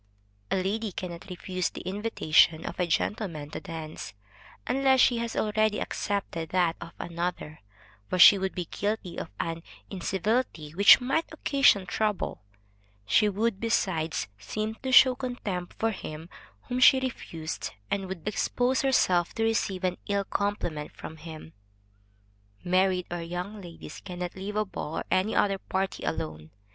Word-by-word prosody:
A - - +1
lady 200 +3 -1
cannot 175 0 -7
refuse 185 0 -2
the - - -8
invitation 180 -5 +2
of - - -6
a 180 - +1
gentleman 165 -4 -2
to - - -4
dance, 155 -8 -7 0.5
unless 265 0 +3
she 240 -2 +5
has 235 -1 -3
already 215 0 +1
accepted 195 -6 -3
that 175 -2 +2
of 170 0 -8
another, 170 -2 -4 0.5
for 185 - 0
she 195 +2 +9
would 190 0 -2
be 180 - -2
guilty 205 -2 -3
of - - -6
an 165 0 -2 0.3
incivility 190 -3 -1
which 200 +8 +8
might 270 +6 -1
occasion 275 -10 +3
trouble; 210 - -1 0.6
she 210 - +4
would 205 0 0
besides 175 -8 0
seem 215 - -3
to 260 0 -2
show 255 0 +8
contempt 230 -9 -4
for 225 0 +1
him 160 -4 -7 0.3
whom 250 0 -3
she 260 +1 +8
refused, 165 -11 -4 0.2
and 195 -1 -1
would 185 -1 -7
expose 245 +4 +1
herself 185 -10 +2
to 225 - 0
receive 210 -4 0
an 180 -1 0
ill 200 0 +1
compliment 190 -7 -2
from 160 - -9
him. 160 0 -10 1.1
Married 185 0 +2
or 175 -1 -3
young 180 +5 -5
ladies 170 -3 -10
cannot 180 -1 -5
leave 195 +2 -5
a 215 0 +1
ball 160 -5 -6
room - - -1
or - - -5
any 185 +4 +2
other 195 -1 +2
party 190 +1 -2
alone. 80 -1 -4
190 Hz, 155 wpm, -28 LUFS, 170-215 Hz, 1.1 s, she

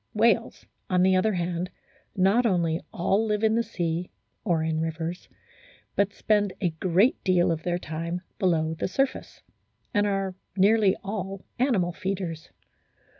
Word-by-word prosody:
Whales, - - +2 0.2
on 180 -1 +3
the 190 0 +4
other 205 +4 +2
hand, 175 0 -2 0.5
not 195 +6 +4
only 170 -7 +1
all 195 +5 +1
live 210 -1 -1
in 220 0 +4
the 230 - +3
sea 175 -5 -2 0.3
(or 170 -6 +1
in 160 0 0
rivers), 165 +2 -4 0.7
but 200 0 +2
spend 205 -2 +1
a 175 -3 0
great 185 +8 +2
deal 180 -2 +3
of 165 -1 -2
their 175 +1 -1
time 170 +1 -4 0.2
below 160 -4 +2
the 160 - -2
surface, 270 +8 -2 0.5
and 205 -2 +3
are 195 -1 -1 0.2
nearly 200 0 +4
all 195 -1 -5
animal 205 -10 +2
feeders. 180 -4 -4
185 Hz, 145 wpm, -26 LUFS, 170-205 Hz, 0.7 s, the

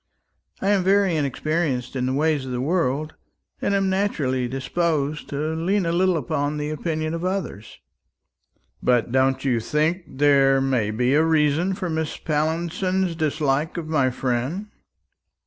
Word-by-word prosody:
I 195 - +2
am 200 -2 +3
very 195 -2 +3
inexperienced 145 -2 -1
in 125 -1 -1
the 130 - 0
ways 150 0 +1
of 130 - -6
the 125 - -2
world, 155 0 0 0.5
and 200 - +1
am 195 -1 +1
naturally 155 -10 0
disposed 150 +3 -1
to 150 +3 -2
lean 180 +4 0
a 165 - 0
little 180 0 +2
upon 145 +1 -2
the 150 0 -3
opinions 155 0 -2
of 165 +1 -4
others." 185 - -4 1.0
"But 120 -2 +2
don't 130 +1 +2
you 125 -4 +2
think 155 - 0
there 135 -1 +4
may 130 -6 +1
be 125 +4 +1
a 155 +2 +4
reason 160 +3 +2
for 185 -1 -4
Mrs. 160 -2 -3
Pallinson's 170 +4 0
dislike 155 0 0
of 160 -2 -5
my 140 -5 +2
friend?" 130 - -2
155 Hz, 150 wpm, -23 LUFS, 135-170 Hz, 1.0 s, there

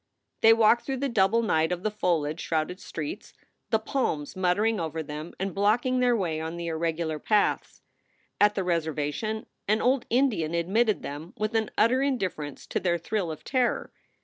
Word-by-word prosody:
They 225 - +8
walked 225 +1 +5
through 270 -1 -3
the 275 +2 -1
double 225 +1 +3
night 160 -5 +2
of 180 0 -2
the 215 - 0
foliage 165 -6 0
shrouded 165 +3 -2
streets, 160 +2 -6 0.4
the 220 - +3
palms 215 - -2
muttering 200 +4 +1
over 160 -1 -3
them 150 +3 -7
and 190 -1 -2
blocking 235 +6 +2
their 245 -1 +3
way 165 -6 -1
on 160 +1 -5
the 170 - -4
irregular 160 -1 -2
paths. 210 +3 0 0.6
At 210 0 +4
the 195 - 0
reservation 170 +5 -2 0.2
an 215 +2 +3
old 255 +1 +1
Indian 225 - +1
admitted 205 +6 +1
them 150 +5 -7
with 215 +1 -2
an 220 -1 +1
utter 250 +4 +4
indifference 190 - -2
to - - -2
their 175 -2 +1
thrill 175 0 -2
of 155 - -8
terror. 255 -2 0
190 Hz, 175 wpm, -27 LUFS, 160-225 Hz, 0.6 s, They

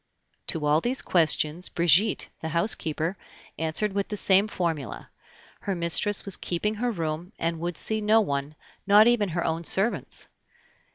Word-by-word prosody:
To 155 -2 -1
all 150 +2 +3
these 250 +5 -2
questions, 165 0 +1
Brigitte, 175 +5 +3
the 160 - -4
housekeeper, 165 -1 0 0.4
answered 160 +6 -1
with 200 0 -1
the 210 - -4
same 195 +1 +3
formula: 165 - -4 0.5
her 195 - -3
mistress 175 +4 +1
was 195 - +1
keeping 195 +5 -2
her 245 - +1
room, 165 -1 -4
and 165 0 -2
would 175 +1 -4
see 220 0 -1
no 215 +2 +4
one, 140 -6 -2 0.3
not 205 +2 +7
even 230 -4 +2
her 170 0 -2
own 165 +1 -2
servants. 195 - +1
175 Hz, 155 wpm, -26 LUFS, 160-210 Hz, 0.5 s, not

